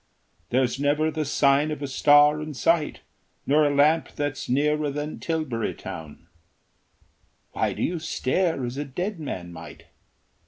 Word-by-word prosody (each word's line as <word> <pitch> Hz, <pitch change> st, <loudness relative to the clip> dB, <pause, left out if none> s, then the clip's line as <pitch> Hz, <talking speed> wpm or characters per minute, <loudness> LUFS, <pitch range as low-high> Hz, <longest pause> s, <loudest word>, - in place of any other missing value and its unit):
There's 130 Hz, +1 st, +1 dB
never 150 Hz, +2 st, +1 dB
the 155 Hz, 0 st, -2 dB
sign 140 Hz, +1 st, +3 dB
of 150 Hz, -1 st, -4 dB
a -, -, -2 dB
star 145 Hz, +2 st, +5 dB
in 155 Hz, -1 st, -6 dB
sight, 155 Hz, +4 st, +1 dB, 0.4 s
Nor 150 Hz, +2 st, +4 dB
a 145 Hz, -, 0 dB
lamp 155 Hz, +3 st, +3 dB
that's 145 Hz, 0 st, -3 dB
nearer 150 Hz, +3 st, +1 dB
than 150 Hz, +2 st, -5 dB
Tilbury 155 Hz, -9 st, -2 dB
Town. 80 Hz, +1 st, -9 dB, 1.3 s
Why -, -, -1 dB
do -, -, -4 dB
you 175 Hz, -1 st, -1 dB
stare 160 Hz, -1 st, -1 dB
as 120 Hz, +2 st, -5 dB
a 145 Hz, -, -2 dB
dead 180 Hz, +8 st, -4 dB
man 90 Hz, -, -6 dB
might? 80 Hz, -2 st, -11 dB
145 Hz, 150 wpm, -25 LUFS, 135-155 Hz, 1.3 s, star